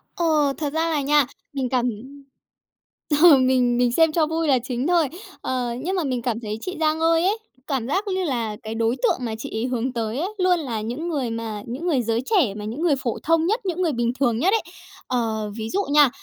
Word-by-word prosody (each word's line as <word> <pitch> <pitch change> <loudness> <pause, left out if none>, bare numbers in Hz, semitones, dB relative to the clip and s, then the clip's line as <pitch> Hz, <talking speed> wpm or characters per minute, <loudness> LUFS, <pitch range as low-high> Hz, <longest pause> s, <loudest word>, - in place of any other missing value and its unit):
Ờ, 305 -5 +2
thật 295 -2 -3
ra 325 +1 +1
là 300 -3 0
nha, 290 0 +4 0.3
mình 260 -3 -2
cảm 250 -1 +1 1.3
ừ, 330 -5 +10
mình 255 -2 +3
mình 245 -1 +3
xem 325 +4 +4
cho 315 0 +2
vui 325 0 -1
là 260 -3 +4
chính 255 +2 -2
thôi. 340 -4 +3 0.3
Ờ, 250 -2 -2
nhưng 370 +5 -2
mà 355 - 0
mình 255 -3 -1
cảm 230 -2 -1
thấy 215 -2 -4
chị 370 +4 -5
Giang 315 0 +1
Ơi 330 +1 +3
ấy, 410 +4 +2 0.3
cảm 260 -5 -1
giác 390 +8 -1
lư 375 -1 -1
là 235 -8 -2
cái 220 +1 -5
đối 230 +2 +1
tượng - - +3
mà 225 -2 -3
chị - - -6
ấy 230 - -1
hướng 250 0 -2
tới 230 +2 -2
ấy, 385 +6 -2
luôn 365 -2 +3
là 235 -8 -3
những 250 +10 -4
người 275 -7 -1
mà 225 -2 -4
những 265 +10 -5
người 275 -7 +2
giới 230 +1 0
trẻ, 325 - +2
mà 210 0 -7
những 235 +9 -5
người 325 -5 +3
phổ 255 -4 -3
thông 330 0 +3
nhất, 435 +6 +1
những 365 0 -1
người 330 -4 +2
bình 235 -2 0
thường 235 -4 +2
nhất 370 +9 +3
ấy. 450 - +3 0.5
Ờ, 220 -4 -1
ví 220 0 -4
dụ 400 +1 0
nha, 295 -3 +6
270 Hz, 235 wpm, -23 LUFS, 235-325 Hz, 1.3 s, ừ